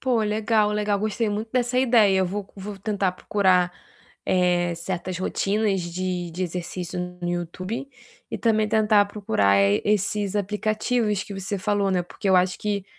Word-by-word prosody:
Pô, 250 -4 +1
legal, 215 0 +1
legal, 210 -1 0
gostei 215 +2 -1
muito 215 +2 -3
dessa 250 0 +1
ideia. 225 -7 +4
Eu 190 - +2
vou 200 +3 -4
c - - -27
vou 195 +1 -7
tentar 200 -2 0
procurar, 185 -2 +2 0.5
eh, 175 -1 +2
certas 180 +1 -4
rotinas 200 +1 0
de 180 0 -3
de 180 +3 -4
exercício 180 +1 -4 0.2
no 175 - -3
YouTube 185 +8 -4 0.4
e - - -3
também 215 -2 +2
tentar 215 -1 +4
procurar, 110 - +1
eh, 100 +1 +3
esses 205 0 0
aplicativos 215 +1 0
que 200 - -8
você 195 +1 -3
falou, 200 0 0
né. 180 -1 +1
Porque 195 +3 -5
eu 190 - +5
acho 180 0 +2
que 205 -2 -2
200 Hz, 165 wpm, -24 LUFS, 180-210 Hz, 0.5 s, eu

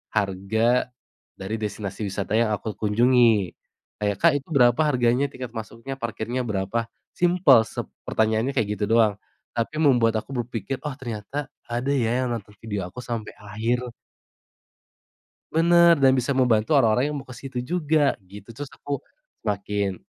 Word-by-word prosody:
harga 110 +5 +1 0.5
dari 95 +3 -4
destinasi 105 -1 -4
wisata 100 +1 -4
yang 115 -2 +2
aku 110 +1 -5
kunjungi 115 -2 +3 0.5
kayak, 105 -1 0
"Kak 170 - +6
itu 135 - -21
berapa 120 -2 +4
harganya? 125 0 +2
Tiket 125 -2 -7
masuknya 115 +4 -6
parkirnya 115 +1 -3
berapa?" 110 +2 -2 0.3
Simpel 175 -9 +5
sep - - -5 0.2
pertanyaannya 110 +4 +1
kayak 110 -6 +1
gitu 105 - +1
doang, 110 -3 +4 0.4
tapi 115 +6 -2
membuat 120 -7 +4
aku 130 - -12
berpikir, 115 +2 -5
"Oh 150 - -3
ternyata 125 +4 -5 0.2
ada 120 +3 -1
ya 125 +1 +1
yang - - -1
nonton 105 -2 -7
video 100 -5 -4
aku 115 +7 -10
sampai 115 -3 -4
akhir." 110 +4 -2 1.7
Bener, 170 +1 +6
dan 135 - +6
bisa 130 +2 0
membantu 125 0 +2
orang-orang 125 +2 +3
yang - - -3
mau - - -18
ke 125 - -9
situ 130 -2 -5
juga 155 0 +1
gitu. 100 +3 -13
Tterus 140 +4 -8
aku 145 -1 -4 0.5
semakin, 100 -2 -2
115 Hz, 150 wpm, -24 LUFS, 105-130 Hz, 1.7 s, Kak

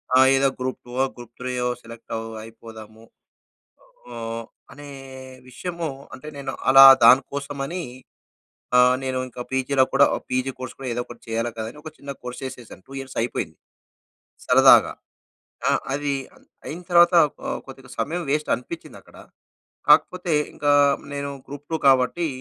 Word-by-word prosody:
ఆ! - - +7 0.2
ఏదో 135 +1 +3
గ్రూప్-2 125 -1 -5
ఓ, - - +4
గ్రూప్-3 120 +1 -8
యో 125 - 0
సెలెక్ట్ 115 0 -13
అవ్ 115 0 -4 0.2
అయిపోదాము. 110 -1 -13 1.1
ఆహ్, 115 0 -5 0.3
అనే 145 +1 -11 0.6
విషయము 170 +5 -5 0.3
అంటే 140 +4 -10
నేను 140 - -5 0.2
అలా 135 0 +10 0.2
దానికోసమని 140 +6 +2 1.2
నేను 130 -1 -2
ఇంకా 125 0 -9
పీజీలో 130 +1 +2
కూడా 140 +1 +6 0.2
పీజీ 130 +1 -1
కోర్స్ 130 -1 -7
కూడా 135 - -7
ఏదో 120 - -2
ఒకటి 120 -1 -13
చేయాలి 115 +1 -2
కదా! 110 - -4
అని 150 - -15
ఒక 155 - -7
చిన్న 140 0 -8
కోర్స్ 125 +1 -7
చేసేశాను. 125 -6 -9
2 135 - -13
ఇయర్స్ 135 0 -9
అయిపోయింది. 120 - -3 0.9
సరదాగా. - - +6 0.8
ఆ - - +3 0.2
అది 145 0 -1 0.5
అయిన 170 +4 -6
తరువాత 175 0 +6 0.3
ఆహ్, - - -3
కొద్దిగా 135 -1 -12
సమయం 170 +3 -2
పేస్ట్ 150 +2 0
అనిపిచ్చిందక్కడ. 160 +6 -11 0.7
కాకపోతే 180 -3 +4 0.2
ఇంకా 145 0 +1 0.4
నేను 140 0 -4 0.2
గ్రూప్-2 145 +3 -5
కాబట్టి 135 +6 +3
135 Hz, 135 wpm, -23 LUFS, 120-145 Hz, 1.2 s, అలా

